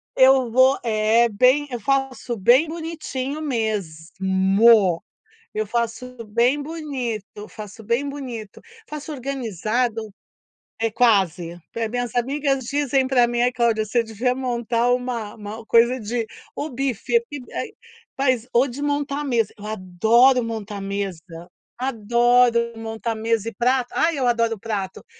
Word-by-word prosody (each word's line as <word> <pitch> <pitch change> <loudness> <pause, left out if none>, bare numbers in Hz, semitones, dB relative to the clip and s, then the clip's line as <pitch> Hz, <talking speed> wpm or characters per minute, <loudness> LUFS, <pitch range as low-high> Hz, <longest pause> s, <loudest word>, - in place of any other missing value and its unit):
eu 260 -2 +5
vou 260 +3 +5
é 225 +1 +3
bem 255 +7 +3
eu 245 - -3
faço 260 -1 -1
bem 245 - +5
bonitinho 310 -4 -5
mesmo, 195 - +2 0.5
eu 215 0 -1
faço 235 +3 -3
bem 240 +7 +2
bonito, 255 -10 -5
faço 215 0 -10
bem 235 +6 -1
bonito, 245 -7 -7 0.3
faço 300 +1 -6
organizado 240 - -2 0.8
é 225 0 +1
quase, 190 -8 +2 0.2
eh, 230 - -1
as - - -4
minhas 245 0 -3
amigas 270 +1 0
dizem 275 0 +1
pra 255 -2 +4
mim: 240 0 -1
“Ai 245 +1 +2
Cláudia, 230 -3 +1
você 235 +2 +1
devia 230 +3 -1
montar 240 -2 0
uma 245 -4 -2
uma 215 +1 -8
coisa 235 +3 +4
de, 230 +1 -3 0.3
ou 300 - -4
buffet, 270 - 0 1.3
ou 245 +3 +4
de 265 +2 -7
montar 290 0 -1
a - - -3
mesa”, 235 -7 0
eu 210 - -10
adoro 220 +6 +3
montar 215 -3 -5
mesa, 195 -3 -3 0.6
adoro 240 -1 +2
montar 225 0 -4
mesa 225 0 -1
e - - -13
prato, 250 0 +1
ai 325 -3 +1
eu 255 - +1
adoro 230 -2 +1
prato, 200 -3 -4
235 Hz, 135 wpm, -22 LUFS, 215-260 Hz, 1.3 s, eu